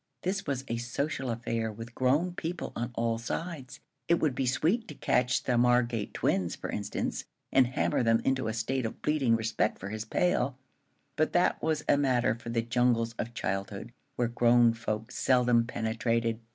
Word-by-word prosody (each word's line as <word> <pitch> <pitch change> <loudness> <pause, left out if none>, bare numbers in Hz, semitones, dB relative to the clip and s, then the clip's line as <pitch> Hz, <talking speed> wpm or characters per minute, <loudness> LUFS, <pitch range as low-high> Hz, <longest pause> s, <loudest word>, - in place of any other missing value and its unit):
This 195 +1 -2
was 135 -1 -2
a 115 - -2
social 130 +3 -2
affair, 115 -1 -2
with 115 +3 -9
grown 145 +9 +1
people 175 0 -4
on 120 +1 -2
all 115 -1 0
sides. 145 +2 -5 0.3
It 170 - +5
would 155 -5 +1
be 130 0 -1
sweet 185 - +1
to - - -9
catch 125 +1 +1
the 125 -2 +1
Margate 120 -3 +2
twins, 90 -3 0
for - - -6
instance, - - -3 0.3
and 130 -2 +5
hammer 130 - 0
them 115 -1 +3
into 130 -3 +1
a 110 - -1
state 115 +2 -1
of - - -10
bleating 140 -6 +2
respect 110 -1 0
for 100 - -7
his 110 +1 -4
pail; 135 -2 +1 0.6
but 155 0 +1
that 180 +1 +2
was 155 -1 -1
a 145 - +5
matter 130 -4 +2
for 115 0 -9
the 115 0 0
jungles 115 -1 +1
of 120 +1 -4
childhood, 100 +3 -3 0.2
where 120 - +1
grown 120 0 +4
folk 110 -1 -4
seldom 125 -2 +3
penetrated. 115 0 -1
120 Hz, 180 wpm, -29 LUFS, 115-135 Hz, 0.6 s, It